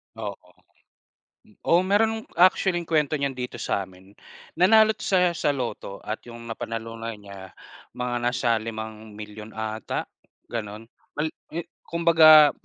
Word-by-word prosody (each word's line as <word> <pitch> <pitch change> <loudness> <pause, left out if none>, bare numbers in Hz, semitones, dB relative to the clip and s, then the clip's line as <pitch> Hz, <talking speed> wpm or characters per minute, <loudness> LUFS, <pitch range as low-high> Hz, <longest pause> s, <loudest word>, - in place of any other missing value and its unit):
Oo. 100 -5 -7 1.1
Oo 170 - +4
meron, 220 +2 +2
actually, 185 0 +4
kuwento 155 -3 +1
niyan 140 -2 0
dito 125 -1 -6
sa'min. 95 0 -4 0.5
Nanalo 220 +4 +6
siya, 180 -2 +2
sa 155 -3 0
lotto, 120 -6 -5
at 105 - -4
'yong 120 -1 -10
napanalunan 115 0 -5
niya, 100 -2 -12 0.4
mga 125 0 -2
nasa 120 -1 +1
5,000,000 110 -1 -8
ata, 110 0 -4 0.4
gano'n. 105 -2 -5 0.3
Mal 155 +2 -1 0.2
i 170 - -2 0.2
Kumbaga, 160 -3 +7
120 Hz, 115 wpm, -25 LUFS, 110-165 Hz, 1.1 s, Kumbaga